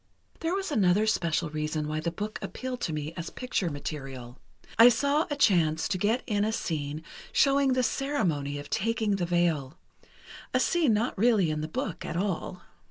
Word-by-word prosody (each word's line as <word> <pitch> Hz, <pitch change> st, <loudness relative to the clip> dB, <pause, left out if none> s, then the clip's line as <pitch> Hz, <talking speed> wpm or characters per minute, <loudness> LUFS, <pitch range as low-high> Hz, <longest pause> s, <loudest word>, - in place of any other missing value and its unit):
"There 335 Hz, +2 st, -1 dB
was 390 Hz, -3 st, -3 dB
another 205 Hz, -4 st, +3 dB
special 165 Hz, -7 st, 0 dB
reason 155 Hz, 0 st, -2 dB
why 155 Hz, +1 st, -2 dB
the 165 Hz, +2 st, -1 dB
book 210 Hz, +6 st, -5 dB
appealed 255 Hz, -1 st, -5 dB
to -, -, -1 dB
me 155 Hz, +1 st, -4 dB
as 170 Hz, -1 st, -5 dB
picture 250 Hz, -8 st, -2 dB
material: 135 Hz, -4 st, -7 dB, 0.4 s
I 235 Hz, +2 st, +10 dB
saw 285 Hz, +6 st, +1 dB
a 290 Hz, -, -1 dB
chance 165 Hz, -, +3 dB
to 185 Hz, -, -1 dB
get 220 Hz, +6 st, +1 dB
in 205 Hz, -3 st, 0 dB
a 215 Hz, -, +1 dB
scene 155 Hz, -6 st, -3 dB, 0.3 s
showing 275 Hz, -1 st, +3 dB
the 255 Hz, 0 st, +2 dB
ceremony 180 Hz, -, -1 dB
of 145 Hz, -, -7 dB
taking 220 Hz, -1 st, 0 dB
the 175 Hz, -2 st, -1 dB
veil—a 170 Hz, -5 st, -3 dB
scene 315 Hz, -, +3 dB
not 230 Hz, +4 st, 0 dB
really 210 Hz, -7 st, +4 dB
in 155 Hz, 0 st, -2 dB
the 155 Hz, -, -3 dB
book 155 Hz, -, -4 dB
at 165 Hz, -, -4 dB
all." 185 Hz, -1 st, -3 dB
180 Hz, 175 wpm, -28 LUFS, 155-240 Hz, 0.4 s, I